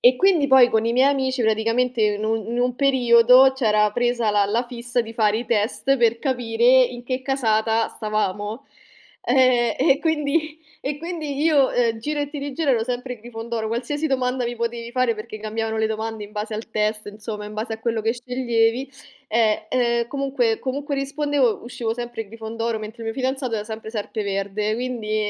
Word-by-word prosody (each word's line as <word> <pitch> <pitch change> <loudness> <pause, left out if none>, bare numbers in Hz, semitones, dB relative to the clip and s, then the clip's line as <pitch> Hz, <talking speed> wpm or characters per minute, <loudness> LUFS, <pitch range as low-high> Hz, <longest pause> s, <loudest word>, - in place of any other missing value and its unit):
e 250 +1 +6
quindi 350 -4 +3
poi 265 -2 +7
con 220 0 +2
i 230 - +1
miei 260 +3 +4
amici 260 -2 0
praticamente 230 +3 +1
in 210 0 +1
un 220 -1 -1
in 240 +1 -2
un 250 0 0
periodo 255 -1 +6
c'era 215 -5 +2
presa 240 -1 0
la 205 -1 +3
la 225 +5 0
fissa 240 0 -2
di 225 -1 -6
fare 215 -1 +2
i 235 - -5
test 235 +5 +1
per 235 -1 +2
capire 235 -4 -1 0.2
in 245 0 -6
che 255 +1 -3
casata 225 -4 +1
stavamo 215 +1 -3 0.6
ehm, 245 -2 +3
e 275 - +4
quindi 310 0 0 0.2
e 280 +2 -3
quindi 310 -4 -4
io 295 -5 +4 0.3
giro 295 +5 -3
e 290 - -2
ti 295 - -6
rigiro 285 +1 -1
ero 225 -3 +2
sempre 250 0 -4
Grifondoro, 225 0 -5
qualsiasi 250 +7 -2
domanda 255 -2 0
mi 240 0 -3
potevi 235 0 -4
fare, 255 -2 +2
perché 215 0 -8
cambiavano 220 +1 -3
le 220 - +1
domande 220 0 -4
in 205 - -9
base 210 +1 -4
al 225 +1 -6
test, 215 0 -1
insomma, 210 0 -6
in 210 - -9
base 220 +2 -4
a 220 - -6
quello 225 -1 -1
che 225 +1 +1
sceglievi, 245 0 0 0.4
ehm, 220 -2 +2
e 235 -2 +1
comunque 265 -5 0
comunque 280 +2 -3
rispondevo, 275 -3 0
uscivo 240 -2 -3
sempre 240 -3 -6
Grifondoro 225 +1 -4
mentre 215 +2 -8
il 225 - -4
mio 225 - -2
fidanzato 260 -2 -1
era 210 - -4
sempre 220 0 -7
Serpeverde, 210 -1 -2
quindi 235 -3 -3
235 Hz, 185 wpm, -22 LUFS, 220-260 Hz, 0.6 s, poi